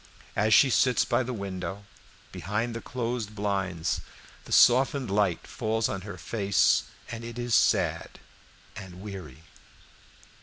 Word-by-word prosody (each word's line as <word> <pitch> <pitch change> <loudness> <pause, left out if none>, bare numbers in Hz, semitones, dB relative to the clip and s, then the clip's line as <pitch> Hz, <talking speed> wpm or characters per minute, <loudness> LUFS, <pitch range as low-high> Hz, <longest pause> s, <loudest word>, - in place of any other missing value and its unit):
As 110 +2 +1
she 130 +5 +6
sits 125 -1 +3
by - - +1
the 130 0 -3
window, 100 -2 -5 0.5
behind 105 +5 -3
the 115 - -5
closed 115 -3 -4
blinds, 95 -5 -1 0.4
the - - -12
softened 130 -1 +4
light 100 -4 +1
falls 110 -2 -1
on 95 - -4
her 100 +1 -8
face, 100 -3 +2 0.3
and 115 0 -6
it 120 0 -7
is 120 -1 -2
sad - - +2 0.6
and 95 -3 -10
weary. 85 -8 -9
105 Hz, 130 wpm, -27 LUFS, 95-120 Hz, 0.6 s, she